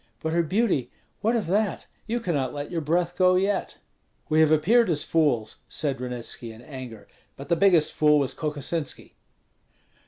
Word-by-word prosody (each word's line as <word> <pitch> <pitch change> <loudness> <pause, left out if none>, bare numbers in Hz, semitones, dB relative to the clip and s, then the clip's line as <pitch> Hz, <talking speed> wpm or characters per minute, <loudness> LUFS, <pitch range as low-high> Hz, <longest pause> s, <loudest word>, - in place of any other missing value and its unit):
But 160 0 -3
her 170 - +3
beauty, 170 - 0 0.3
what 225 +3 +1
of 225 - 0
that? 205 +3 0 0.2
You 235 +2 -1
cannot 145 - -2
let 145 +2 -5
your 170 -2 -2
breath 170 +3 0
go 185 0 +4
yet." 195 +1 0 0.5
"We 155 - +3
have 160 -1 +5
appeared 190 +9 +4
as 155 -3 +1
fools," 140 -9 +1
said 140 -4 -2
Ranitski, 120 -2 -5
in 110 +2 -13
anger; 130 -7 -9 0.3
"but 140 +3 -10
the 170 - +4
biggest 170 -3 +4
fool 150 -1 +4
was 140 -3 0
Kokosinski." 150 +1 -4
155 Hz, 165 wpm, -25 LUFS, 140-185 Hz, 0.5 s, have